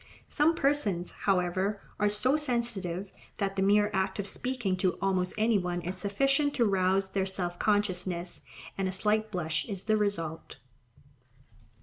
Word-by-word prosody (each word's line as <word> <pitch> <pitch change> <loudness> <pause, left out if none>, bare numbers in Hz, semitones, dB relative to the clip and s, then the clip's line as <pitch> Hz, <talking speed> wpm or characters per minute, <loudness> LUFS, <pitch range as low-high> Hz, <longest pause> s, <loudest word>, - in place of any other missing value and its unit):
Some 315 +3 +3
persons, 220 - +1
however, 190 +1 0 0.2
are 210 - +3
so 250 +7 +2
sensitive, 235 - -1 0.3
that 195 -2 -1
the 195 - 0
mere 205 +2 +4
act 190 0 0
of 205 - -2
speaking 240 -3 -1
to 185 -1 +1
almost 185 -2 +1
any 220 -1 +3
one 175 -1 -2
is 180 +2 -4
sufficient 275 +10 +1
to 235 - +3
rouse 190 -1 +2
their 190 -1 0
self 180 -2 -3
consciousness, 185 -4 0 0.4
and 195 - +1
a - - -1
slight 215 +3 +1
blush 170 -6 -2
is 195 -2 -3
the 215 +1 +2
result. 165 -6 -2
195 Hz, 150 wpm, -29 LUFS, 185-215 Hz, 0.4 s, mere